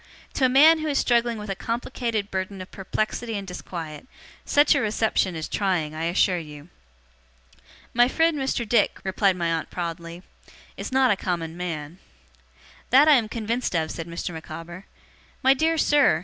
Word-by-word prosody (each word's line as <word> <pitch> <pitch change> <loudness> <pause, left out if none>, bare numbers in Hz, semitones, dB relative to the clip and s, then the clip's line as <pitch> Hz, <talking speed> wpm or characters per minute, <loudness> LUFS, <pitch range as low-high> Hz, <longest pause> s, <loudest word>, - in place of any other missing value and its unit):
To 265 - +2
a - - +4
man 310 +5 +6
who 310 - -3
is 285 -2 0
struggling 235 -1 +2
with 210 -1 -5
a - - -2
complicated 230 -1 -3
burden 190 +1 -3
of 185 - -9
perplexity 215 +3 -3
and 200 -1 -6
disquiet, 170 +1 -7 0.4
such 290 +1 +4
a 285 - +1
reception 215 -4 0
is 160 -1 -4
trying, 180 -7 -1
I 160 +1 -3
assure 180 +1 +2
you.' 150 0 -11 1.2
'My 240 +1 +5
friend 325 +4 +2
Mr. 265 -4 -2
Dick,' 215 -1 +2
replied 190 0 +1
my 170 -2 -1
aunt 165 -1 -2
proudly, 170 0 -6 0.5
'is - - -6
not 260 -1 +4
a - - +3
common 170 -4 -3
man.' 170 -1 -5 0.9
'That 275 +4 +6
I - - +8
am 230 -6 +3
convinced 230 -1 -2
of,' 160 -1 0
said 165 -1 -6
Mr. 170 +1 -5
Micawber. 165 +3 -9 0.6
'My 265 +1 +6
dear 320 +4 +1
sir! 290 - +4
195 Hz, 170 wpm, -24 LUFS, 170-245 Hz, 1.2 s, I